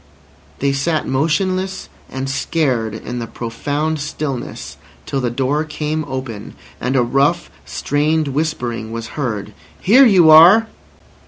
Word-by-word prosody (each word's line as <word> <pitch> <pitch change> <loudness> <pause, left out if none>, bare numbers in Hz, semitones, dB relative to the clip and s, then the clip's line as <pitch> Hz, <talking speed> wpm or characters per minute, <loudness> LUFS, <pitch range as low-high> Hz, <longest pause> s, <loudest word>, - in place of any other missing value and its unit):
They 140 0 +1
sat 155 +3 -1
motionless 185 +7 -1 0.2
and 130 +1 -4
scared 135 -6 -1
in 120 +2 -6
the 115 - -5
profound 145 +8 -3
stillness, 145 -3 -5 0.3
till 135 - -2
the 125 - 0
door 135 +5 0
came 155 0 -3
open, 130 -6 -6 0.2
and 130 +2 -2
a 125 - +4
rough, 140 +8 +1 0.2
strained 150 +1 0
whispering 125 -7 -3
was 115 0 -6
heard: 110 -7 -4 0.3
"Here 255 +7 +6
you 180 -7 +6
are!" 180 +8 +8
145 Hz, 130 wpm, -18 LUFS, 125-160 Hz, 0.3 s, are